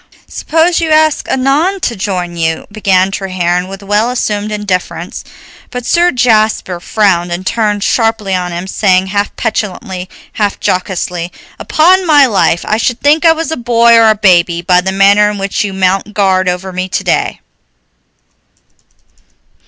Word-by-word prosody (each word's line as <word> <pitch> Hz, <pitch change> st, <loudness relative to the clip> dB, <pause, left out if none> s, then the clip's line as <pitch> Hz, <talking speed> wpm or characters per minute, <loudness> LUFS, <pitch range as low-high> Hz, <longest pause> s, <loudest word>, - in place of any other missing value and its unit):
"Suppose 330 Hz, +2 st, 0 dB
you 325 Hz, -, -1 dB
ask 310 Hz, -1 st, +2 dB
Annon 290 Hz, +9 st, +1 dB
to 240 Hz, -, -2 dB
join 185 Hz, -3 st, -4 dB
you 160 Hz, -1 st, -2 dB
" -, -, -35 dB
began 195 Hz, -3 st, +1 dB
Treherne 185 Hz, -2 st, -2 dB
with 195 Hz, +1 st, -9 dB
well 205 Hz, +4 st, 0 dB
assumed 215 Hz, -4 st, -2 dB
indifference; 205 Hz, -3 st, -4 dB, 0.5 s
but 250 Hz, -1 st, -6 dB
Sir 345 Hz, +5 st, +3 dB
Jasper 220 Hz, -7 st, +1 dB
frowned 180 Hz, -3 st, 0 dB
and 175 Hz, +2 st, -4 dB
turned 210 Hz, -1 st, -1 dB
sharply 225 Hz, -4 st, 0 dB
on 180 Hz, -1 st, -2 dB
him, 175 Hz, +1 st, -5 dB
saying, 190 Hz, -1 st, +1 dB
half 205 Hz, 0 st, -1 dB
petulantly, 190 Hz, -4 st, -4 dB, 0.2 s
half 205 Hz, -2 st, -1 dB
jocosely: 180 Hz, -1 st, -2 dB, 0.3 s
"Upon 360 Hz, +4 st, +2 dB
my 295 Hz, -3 st, +6 dB
life 195 Hz, -7 st, +1 dB
I 215 Hz, -, +1 dB
should 235 Hz, +1 st, -1 dB
think 300 Hz, +3 st, +2 dB
I 325 Hz, -, +6 dB
was 325 Hz, 0 st, -4 dB
a -, -, -1 dB
boy 235 Hz, -1 st, +3 dB
or 225 Hz, -1 st, +5 dB
a 215 Hz, -, +3 dB
baby, 175 Hz, -4 st, +2 dB
by 180 Hz, 0 st, +3 dB
the 190 Hz, +1 st, -2 dB
manner 200 Hz, +2 st, +4 dB
in 210 Hz, -, -5 dB
which 195 Hz, 0 st, -2 dB
you 205 Hz, -, -3 dB
mount 190 Hz, +2 st, -1 dB
guard 190 Hz, -2 st, +1 dB
over 180 Hz, +1 st, -4 dB
me 185 Hz, +1 st, -4 dB
today. -, -, -1 dB
205 Hz, 160 wpm, -12 LUFS, 185-235 Hz, 0.5 s, my